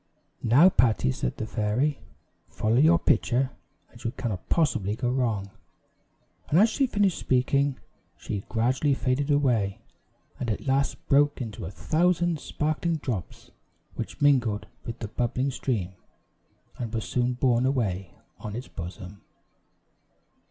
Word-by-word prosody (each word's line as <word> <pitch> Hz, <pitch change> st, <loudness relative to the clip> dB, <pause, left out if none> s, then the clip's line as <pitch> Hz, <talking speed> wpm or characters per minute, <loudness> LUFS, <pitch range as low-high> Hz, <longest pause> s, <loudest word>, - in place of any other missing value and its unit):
"Now, 135 Hz, +11 st, +6 dB
Patty," 115 Hz, -, +2 dB
said 60 Hz, -1 st, -3 dB
the -, -, -3 dB
fairy, 115 Hz, +7 st, 0 dB, 0.5 s
"follow 110 Hz, +2 st, 0 dB
your 160 Hz, +4 st, +6 dB
pitcher, 130 Hz, -4 st, +1 dB, 0.4 s
and 115 Hz, -, -15 dB
you 115 Hz, -, 0 dB
cannot 115 Hz, -6 st, -5 dB
possibly 115 Hz, -, +1 dB
go 120 Hz, +1 st, -1 dB
wrong;" 110 Hz, -7 st, -1 dB, 1.0 s
and 155 Hz, -, +3 dB
as 215 Hz, +5 st, +6 dB
she 275 Hz, -, +1 dB
finished 205 Hz, -6 st, +1 dB
speaking, 135 Hz, +2 st, +1 dB, 0.4 s
she 100 Hz, -2 st, -5 dB
gradually 130 Hz, +5 st, +1 dB
faded 135 Hz, +2 st, 0 dB
away, 120 Hz, -9 st, +2 dB, 0.6 s
and 120 Hz, -, -2 dB
at 105 Hz, -, -3 dB
last 140 Hz, +1 st, 0 dB
broke 145 Hz, +1 st, +3 dB
into 110 Hz, -8 st, -5 dB
a -, -, -4 dB
thousand 170 Hz, -, +1 dB
sparkling 155 Hz, +4 st, -1 dB
drops, 125 Hz, -, -5 dB, 0.4 s
which -, -, -6 dB
mingled 120 Hz, -8 st, +3 dB, 0.2 s
with 115 Hz, +1 st, -4 dB
the 110 Hz, -, -5 dB
bubbling 125 Hz, +5 st, -1 dB
stream, 105 Hz, -9 st, -2 dB, 0.9 s
and 115 Hz, -3 st, -4 dB
were 110 Hz, -, -2 dB
soon 125 Hz, +3 st, 0 dB
borne 125 Hz, 0 st, +2 dB
away 100 Hz, -9 st, -1 dB, 0.2 s
on 105 Hz, -1 st, -6 dB
its 125 Hz, +3 st, -6 dB
bosom. 90 Hz, +2 st, -8 dB
125 Hz, 135 wpm, -26 LUFS, 110-145 Hz, 1.0 s, Now